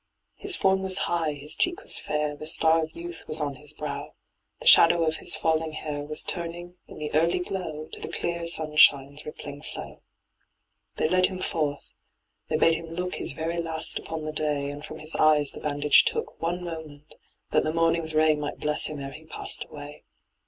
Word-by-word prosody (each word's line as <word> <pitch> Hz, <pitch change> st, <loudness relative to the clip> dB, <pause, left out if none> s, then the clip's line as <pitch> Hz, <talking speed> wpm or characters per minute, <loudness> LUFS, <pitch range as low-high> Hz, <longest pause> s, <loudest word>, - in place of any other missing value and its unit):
His 400 Hz, -2 st, 0 dB
form 190 Hz, -1 st, +2 dB
was 190 Hz, 0 st, +1 dB
high, 165 Hz, -3 st, 0 dB
his 145 Hz, +1 st, -3 dB
cheek 355 Hz, +2 st, 0 dB
was -, -, +4 dB
fair, 150 Hz, -1 st, -2 dB
The 155 Hz, +1 st, -7 dB
star 165 Hz, 0 st, +5 dB
of 155 Hz, 0 st, -8 dB
youth 170 Hz, 0 st, -5 dB
was 155 Hz, -, +2 dB
on 145 Hz, -3 st, -3 dB
his 150 Hz, 0 st, -2 dB
brow, 150 Hz, -2 st, -6 dB, 0.4 s
The -, -, -11 dB
shadow 170 Hz, 0 st, +8 dB
of 160 Hz, 0 st, +1 dB
his -, -, +1 dB
falling 160 Hz, -1 st, 0 dB
hair 150 Hz, -1 st, -4 dB
Was 150 Hz, +1 st, -1 dB
turning, 175 Hz, +1 st, -5 dB
in -, -, -12 dB
the 150 Hz, 0 st, -5 dB
early 165 Hz, +2 st, +3 dB
glow. 180 Hz, -4 st, -4 dB
To -, -, -4 dB
the -, -, -5 dB
clear 170 Hz, -1 st, -3 dB
sunshine's 150 Hz, -3 st, +3 dB
rippling 145 Hz, -1 st, -8 dB
flow. -, -, -8 dB, 0.9 s
They -, -, +1 dB
led 185 Hz, +2 st, +4 dB
him 185 Hz, -, -6 dB
forth. 150 Hz, -5 st, -2 dB, 0.6 s
They -, -, 0 dB
bade 165 Hz, -, +4 dB
him 165 Hz, 0 st, -4 dB
look 180 Hz, +2 st, -4 dB
His -, -, -1 dB
very 165 Hz, +3 st, -2 dB
last 160 Hz, -1 st, +1 dB
upon 160 Hz, -1 st, -6 dB
the 155 Hz, -, -3 dB
day, 150 Hz, -2 st, -1 dB
And 145 Hz, +1 st, -9 dB
from -, -, -8 dB
his 155 Hz, +1 st, +1 dB
eyes 150 Hz, -2 st, +4 dB
the -, -, -7 dB
bandage 145 Hz, 0 st, +4 dB
took 460 Hz, +1 st, -3 dB
One 175 Hz, +2 st, -2 dB
moment, 160 Hz, -3 st, -9 dB, 0.4 s
that -, -, +3 dB
the 155 Hz, -, -1 dB
morning's 165 Hz, -1 st, 0 dB
ray 155 Hz, 0 st, +4 dB
Might 150 Hz, -1 st, -5 dB
bless 150 Hz, 0 st, 0 dB
him 150 Hz, -2 st, -6 dB
ere 135 Hz, 0 st, -6 dB
he 155 Hz, +3 st, -12 dB
passed 155 Hz, -, -3 dB
away. 145 Hz, 0 st, -10 dB
155 Hz, 200 wpm, -26 LUFS, 150-170 Hz, 0.9 s, shadow